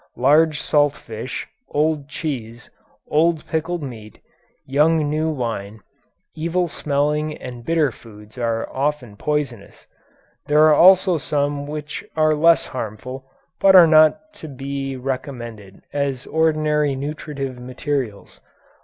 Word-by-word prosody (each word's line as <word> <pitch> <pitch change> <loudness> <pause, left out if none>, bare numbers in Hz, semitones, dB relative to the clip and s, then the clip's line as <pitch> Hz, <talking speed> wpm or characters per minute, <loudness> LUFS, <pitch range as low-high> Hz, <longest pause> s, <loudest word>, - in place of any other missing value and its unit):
Large 150 +4 +4
salt 145 -1 +2
fish, 115 +1 -7 0.2
old 150 -1 0
cheese, 120 -7 -6 0.4
old 160 +1 +2
pickled 165 +1 -2
meat, 110 -6 -9 0.5
young 150 +3 +2
new 155 +1 0
wine, 110 -7 -4 0.5
evil 170 +3 -1
smelling 150 0 -1
and 125 -2 -9
bitter 155 0 +1
foods 105 -2 -15
are 115 -2 -2
often 135 -5 -2
poisonous. 135 -5 -4 0.6
There 150 +1 +5
are 155 -1 +6
also 185 +1 +6
some 145 0 -1
which 150 0 -6
are 155 -1 +3
less 165 +2 +4
harmful, 130 +3 -7 0.3
but 195 -1 +6
are 180 -2 +10
not 160 - +4
to 160 - -7
be 135 -1 -5
recommended 120 -6 -6
as 140 -3 -2
ordinary 155 -2 +1
nutritive 140 -2 -5
materials. 125 -3 -4
145 Hz, 120 wpm, -21 LUFS, 125-155 Hz, 0.6 s, are